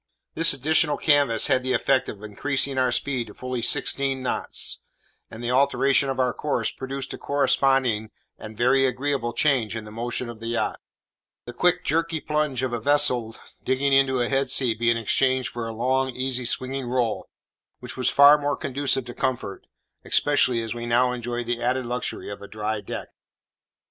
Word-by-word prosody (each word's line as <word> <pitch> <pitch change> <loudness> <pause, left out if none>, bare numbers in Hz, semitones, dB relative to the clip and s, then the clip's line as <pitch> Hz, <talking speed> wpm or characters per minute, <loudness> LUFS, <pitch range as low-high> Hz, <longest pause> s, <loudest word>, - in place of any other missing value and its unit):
This 165 +1 +2
additional 145 +2 +1
canvas 140 -7 +3
had 130 -3 +2
the 130 0 -1
effect 130 +2 +1
of 105 0 -9
increasing 135 +5 -1
our 130 -1 +2
speed 125 -1 -2
to - - -13
fully 125 -1 -4
sixteen 135 +2 +1
knots; - - 0 0.5
and 110 +2 -10
the 120 - -1
alteration 140 +1 +2
of 135 - -3
our 125 -1 +1
course 150 - -2
produced 135 +1 -5
a - - -8
corresponding 135 -5 +1 0.3
and 110 0 -10
very 130 +3 +3
agreeable 130 -2 -2
change 125 -6 +1
in 110 - -5
the 105 - -10
motion 120 +2 -4
of 120 -2 -9
the 115 - -7
yacht; 115 0 -2 0.7
the 120 - -8
quick 180 +6 +1
jerky 165 +1 0
plunge 150 -4 -1
of 130 -2 -2
a 120 - -1
vessel 125 -5 +3 0.3
digging 135 +2 +1
into 135 -1 +3
a 120 - +1
head 135 +1 0
sea 125 -4 +3
being 115 +1 +1
exchanged 130 +3 +1
for 120 -1 -5
a - - -4
long 130 +4 0
easy 130 0 -3
swinging 130 +2 -2
roll, 120 -3 -1 0.5
which - - -9
was 125 -1 +1
far 145 +1 +7
more 145 0 -1
conducive 135 -1 0
to 120 - -8
comfort, 120 -8 -3 0.4
especially 130 -5 +2
as 110 -1 -4
we 120 0 -6
now 125 +2 +3
enjoyed 120 0 -4
the 120 0 -3
added 125 +1 0
luxury 125 +1 -4
of 100 - -7
a 100 - -9
dry 110 0 -3
deck. - - -7
130 Hz, 180 wpm, -24 LUFS, 120-140 Hz, 0.7 s, far